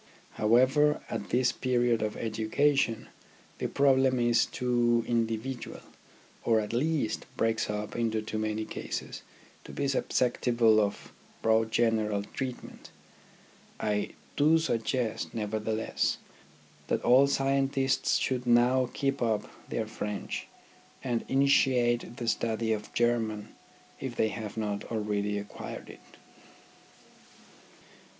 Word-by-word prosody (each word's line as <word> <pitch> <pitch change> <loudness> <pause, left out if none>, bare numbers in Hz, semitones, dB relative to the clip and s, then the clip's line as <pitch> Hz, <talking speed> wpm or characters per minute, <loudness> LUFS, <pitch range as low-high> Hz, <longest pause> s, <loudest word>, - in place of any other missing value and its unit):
However, 130 +7 +3
at 110 -3 -4
this 125 0 +2
period 120 -2 +1
of 105 -1 -2
education 115 +3 +1 0.5
the - - -1
problem 130 -2 +3
is 120 -1 +3
too 120 -1 +1
individual, 115 +2 -2 0.6
or 115 -1 +3
at 105 +1 -4
least 140 -2 0
breaks 115 -1 0
up 105 0 -4
into 115 -2 0
too 110 0 -4
many 110 0 -2
cases, - - -5 0.4
to - - -10
be 140 - -2
susceptible 120 -4 +2
of 100 -1 -3 0.3
broad 110 0 +3
general 110 -3 +1
treatment. 130 +4 -7 0.9
I 105 -1 -1 0.2
do 155 +3 +5
suggest, 120 -5 -1
nevertheless, 110 0 -1 0.7
that - - -1
all 130 +3 +6
scientists 135 -1 +1
should 125 -1 -1
now 125 +1 +4
keep 135 -1 -1
up 110 -3 0 0.2
their - - -1
French, 105 -1 -5 0.6
and 120 -3 -1
initiate 125 -3 +2
the 120 - -4
study 115 0 0
of 105 -1 -5
German 115 -3 0 0.5
if - - -5
they 110 - +2
have 110 -1 -6
not 105 -2 -2
already 105 -2 -1
acquired 100 0 -7
it. - - -18
115 Hz, 115 wpm, -29 LUFS, 110-130 Hz, 0.9 s, all